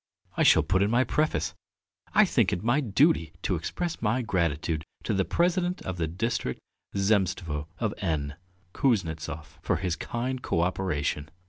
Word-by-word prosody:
I -, -, 0 dB
shall 80 Hz, -, +6 dB
put 95 Hz, +5 st, +2 dB
in 100 Hz, -, +3 dB
my 120 Hz, +3 st, +4 dB
preface: 90 Hz, -, 0 dB, 0.6 s
'I -, -, +7 dB
think -, -, +2 dB
it 90 Hz, -, -2 dB
my 120 Hz, +6 st, +3 dB
duty 120 Hz, -, +2 dB
to -, -, +1 dB
express 165 Hz, -, -3 dB
my 115 Hz, +3 st, +1 dB
gratitude 80 Hz, -5 st, 0 dB, 0.2 s
to -, -, -1 dB
the 95 Hz, -, +2 dB
President 180 Hz, +1 st, +1 dB
of 95 Hz, -1 st, -4 dB
the 80 Hz, -2 st, 0 dB
District 90 Hz, -, -2 dB, 0.4 s
Zemstvo 95 Hz, -7 st, +1 dB
of 110 Hz, -3 st, -1 dB
N, 75 Hz, -6 st, -1 dB, 0.4 s
Kuznetsov, 80 Hz, -, -1 dB
for -, -, +1 dB
his 90 Hz, -1 st, -1 dB
kind 125 Hz, +5 st, -3 dB
co 85 Hz, -8 st, 0 dB
operation.' 75 Hz, -5 st, -1 dB
95 Hz, 155 wpm, -28 LUFS, 80-120 Hz, 0.6 s, I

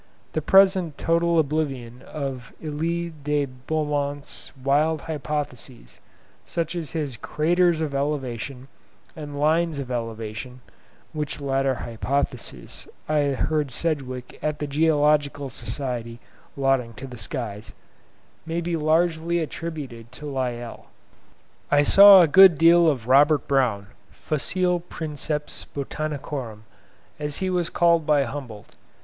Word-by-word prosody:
The 155 Hz, -, 0 dB
present 190 Hz, -2 st, +4 dB
total 170 Hz, 0 st, +2 dB
oblivion 135 Hz, -6 st, -1 dB
of 135 Hz, -4 st, -6 dB
Elie 165 Hz, +2 st, -3 dB
de 145 Hz, 0 st, +1 dB
Beaumont's 145 Hz, +2 st, -3 dB
wild 145 Hz, +4 st, +1 dB
hypotheses, 145 Hz, -, -5 dB, 0.4 s
such 165 Hz, -1 st, -3 dB
as 165 Hz, -4 st, -5 dB
his 145 Hz, -7 st, -3 dB
'Craters 170 Hz, +4 st, +1 dB
of 150 Hz, -3 st, -2 dB
Elevation' 135 Hz, -2 st, -3 dB, 0.5 s
and 145 Hz, -2 st, -7 dB
'Lines 160 Hz, +1 st, +2 dB
of 135 Hz, -2 st, -5 dB
Elevation' 115 Hz, +1 st, -5 dB, 0.5 s
(which 150 Hz, -2 st, -3 dB
latter 135 Hz, -1 st, 0 dB
hypothesis 125 Hz, +5 st, -3 dB, 0.2 s
I 150 Hz, -1 st, +2 dB
heard 145 Hz, +1 st, 0 dB
Sedgwick 130 Hz, -4 st, -4 dB
at 150 Hz, -1 st, -1 dB
the 150 Hz, -, -3 dB
Geological 145 Hz, -2 st, +2 dB
Society 120 Hz, 0 st, -4 dB, 0.4 s
lauding 135 Hz, -4 st, +1 dB
to 125 Hz, -, -8 dB
the 125 Hz, -3 st, -9 dB
skies), 105 Hz, -1 st, -5 dB, 0.7 s
may 165 Hz, +1 st, -3 dB
be 170 Hz, 0 st, -2 dB
largely 165 Hz, +1 st, +1 dB
attributed 150 Hz, -8 st, -5 dB
to 150 Hz, -, -9 dB
Lyell. 125 Hz, -4 st, -4 dB, 0.8 s
I 145 Hz, 0 st, +4 dB
saw 195 Hz, +3 st, +9 dB
a -, -, +4 dB
good 190 Hz, +1 st, +8 dB
deal 170 Hz, +2 st, +6 dB
of 130 Hz, -7 st, +1 dB
Robert 145 Hz, +3 st, +4 dB
Brown, 125 Hz, -8 st, +1 dB, 0.2 s
"facile 180 Hz, +4 st, -1 dB
Princeps 150 Hz, -3 st, -5 dB
Botanicorum," 140 Hz, -6 st, -4 dB, 0.6 s
as 150 Hz, -1 st, -3 dB
he 190 Hz, -1 st, -1 dB
was 175 Hz, -2 st, 0 dB
called 170 Hz, -2 st, +3 dB
by 150 Hz, -2 st, +4 dB
Humboldt. 120 Hz, -5 st, -8 dB
145 Hz, 120 wpm, -24 LUFS, 130-160 Hz, 0.8 s, saw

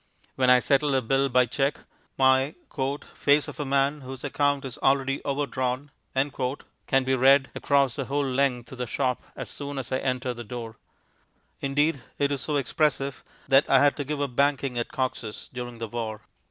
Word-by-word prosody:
When 130 Hz, -1 st, +2 dB
I 125 Hz, -, +8 dB
settle 140 Hz, +2 st, +2 dB
a 130 Hz, -, +3 dB
bill 135 Hz, +4 st, +2 dB
by 125 Hz, 0 st, +4 dB
cheque, 135 Hz, +4 st, -1 dB, 0.4 s
my 130 Hz, +2 st, +4 dB, 0.6 s
"face 145 Hz, +1 st, +3 dB
of -, -, -9 dB
a 145 Hz, -, -1 dB
man 140 Hz, +2 st, +1 dB
whose 130 Hz, -1 st, -8 dB
account 145 Hz, -1 st, 0 dB
is 130 Hz, -, -7 dB
already 135 Hz, 0 st, +1 dB
overdrawn" 140 Hz, -1 st, -2 dB, 0.2 s
can 135 Hz, 0 st, -1 dB
be 130 Hz, 0 st, 0 dB
read 135 Hz, +1 st, +5 dB
across 140 Hz, -3 st, +2 dB
the 135 Hz, -, -2 dB
whole 140 Hz, +2 st, 0 dB
length 130 Hz, -3 st, 0 dB
of 130 Hz, -, -9 dB
the 125 Hz, -, -2 dB
shop 125 Hz, +3 st, -1 dB
as -, -, -6 dB
soon 140 Hz, -1 st, -6 dB
as 135 Hz, -2 st, -5 dB
I 130 Hz, -, +1 dB
enter 130 Hz, -1 st, -1 dB
the 120 Hz, 0 st, -7 dB
door. 115 Hz, -1 st, -7 dB, 0.8 s
Indeed, 145 Hz, +1 st, +1 dB, 0.2 s
it 145 Hz, 0 st, +1 dB
is 140 Hz, -3 st, -1 dB
so 150 Hz, +3 st, -2 dB
expressive 140 Hz, 0 st, 0 dB, 0.2 s
that 135 Hz, +1 st, +4 dB
I 135 Hz, -, +6 dB
had 145 Hz, +1 st, +4 dB
to 145 Hz, -, -2 dB
give 145 Hz, +1 st, -3 dB
up 140 Hz, -4 st, -2 dB
banking 140 Hz, -2 st, +1 dB
at 120 Hz, -, -3 dB
Cox's 125 Hz, -4 st, -4 dB
during 120 Hz, -1 st, -6 dB
the 115 Hz, 0 st, -4 dB
war. 110 Hz, -1 st, -4 dB
135 Hz, 185 wpm, -26 LUFS, 125-140 Hz, 0.8 s, I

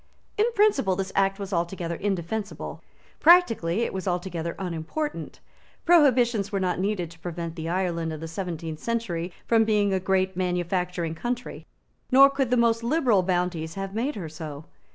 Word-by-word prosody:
In 425 Hz, +2 st, +3 dB
principle 285 Hz, -, +3 dB
this 190 Hz, 0 st, -3 dB
Act 195 Hz, 0 st, +2 dB
was 200 Hz, -1 st, -6 dB
altogether 170 Hz, 0 st, -2 dB
indefensible. 200 Hz, +3 st, -3 dB, 0.4 s
Practically 235 Hz, -, +5 dB
it -, -, -3 dB
was 190 Hz, 0 st, -4 dB
altogether 175 Hz, -2 st, -2 dB
unimportant. 185 Hz, -, -4 dB, 0.5 s
Prohibitions 245 Hz, -, +4 dB
were 200 Hz, -, 0 dB
not 180 Hz, -1 st, -1 dB
needed 190 Hz, -4 st, -1 dB
to 165 Hz, -, -16 dB
prevent 170 Hz, -1 st, -5 dB
the 165 Hz, -1 st, -4 dB
Ireland 170 Hz, -2 st, -1 dB
of 155 Hz, -, -6 dB
the 165 Hz, -, -6 dB
seventeenth 165 Hz, -2 st, -5 dB
century 185 Hz, -7 st, -2 dB
from 225 Hz, -1 st, +4 dB
being 210 Hz, -2 st, +2 dB
a 190 Hz, -, +1 dB
great 190 Hz, 0 st, 0 dB
manufacturing 180 Hz, -1 st, -1 dB
country; 240 Hz, +8 st, -5 dB, 0.4 s
nor 275 Hz, +2 st, +8 dB
could 275 Hz, -3 st, 0 dB
the 250 Hz, -, +2 dB
most 230 Hz, -1 st, +3 dB
liberal 245 Hz, -, +3 dB
bounties 175 Hz, -3 st, -1 dB
have 195 Hz, 0 st, -5 dB
made 245 Hz, +7 st, -1 dB
her 185 Hz, -6 st, -5 dB
so. 155 Hz, -1 st, -8 dB
190 Hz, 160 wpm, -26 LUFS, 170-230 Hz, 0.5 s, nor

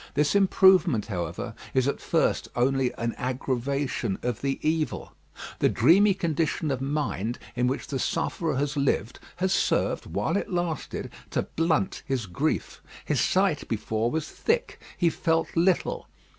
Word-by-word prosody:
This 150 Hz, +1 st, +2 dB
improvement, 190 Hz, -, +5 dB
however, 90 Hz, -6 st, -4 dB, 0.2 s
is 130 Hz, 0 st, +3 dB
at 140 Hz, -, -1 dB
first -, -, +1 dB
only 130 Hz, +1 st, +2 dB
an 115 Hz, 0 st, -2 dB
aggravation 130 Hz, -3 st, -1 dB
of 120 Hz, -2 st, -2 dB
the 135 Hz, -1 st, -1 dB
evil. 155 Hz, -1 st, -1 dB, 0.5 s
The -, -, +4 dB
dreamy 195 Hz, +4 st, +5 dB
condition 160 Hz, -4 st, -1 dB
of 130 Hz, -1 st, -2 dB
mind 135 Hz, -6 st, -2 dB, 0.2 s
in 125 Hz, 0 st, +1 dB
which 130 Hz, +3 st, -2 dB
the 135 Hz, -, -3 dB
sufferer 160 Hz, +4 st, -1 dB
has 145 Hz, +2 st, -1 dB
lived, 135 Hz, -5 st, 0 dB, 0.2 s
has 190 Hz, +1 st, 0 dB
served, -, -, +1 dB
while -, -, -1 dB
it -, -, -3 dB
lasted, 175 Hz, -4 st, -3 dB, 0.2 s
to -, -, 0 dB
blunt 165 Hz, +3 st, 0 dB
his 130 Hz, -5 st, -2 dB
grief. 90 Hz, -3 st, -2 dB, 0.2 s
His -, -, +1 dB
sight 185 Hz, -5 st, +2 dB
before 110 Hz, +1 st, -1 dB
was 155 Hz, +3 st, -2 dB
thick. 470 Hz, +2 st, -1 dB, 0.2 s
He 170 Hz, -2 st, +3 dB
felt 165 Hz, 0 st, 0 dB
little. 175 Hz, +2 st, +1 dB
145 Hz, 145 wpm, -26 LUFS, 125-170 Hz, 0.5 s, improvement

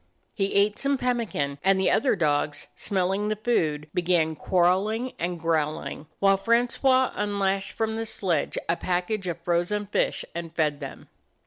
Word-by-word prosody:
He 195 Hz, -2 st, -1 dB
ate 205 Hz, +1 st, +3 dB
some 275 Hz, 0 st, +1 dB
pemmi 245 Hz, -4 st, 0 dB
can; 140 Hz, 0 st, -2 dB
and 195 Hz, 0 st, +4 dB
the 190 Hz, -, +2 dB
other 265 Hz, -, +3 dB
dogs, 150 Hz, -4 st, 0 dB
smelling 195 Hz, +1 st, 0 dB
the 215 Hz, -, 0 dB
food, 160 Hz, -10 st, 0 dB
began 170 Hz, -3 st, +1 dB
quarreling 195 Hz, -, +1 dB
and 175 Hz, 0 st, -2 dB
growling, 155 Hz, -2 st, -1 dB
while 195 Hz, 0 st, +4 dB
Francois 245 Hz, +4 st, +2 dB
unlashed 195 Hz, -1 st, -1 dB
from 220 Hz, 0 st, -1 dB
the 225 Hz, -, -2 dB
sledge 175 Hz, -8 st, -1 dB
a 170 Hz, -, +2 dB
package 185 Hz, +3 st, -2 dB
of 170 Hz, -1 st, -3 dB
frozen 175 Hz, +4 st, 0 dB
fish 200 Hz, -, 0 dB
and 170 Hz, -1 st, -6 dB
fed 150 Hz, -3 st, +1 dB
them. 140 Hz, -3 st, -8 dB
190 Hz, 155 wpm, -26 LUFS, 165-215 Hz, -, and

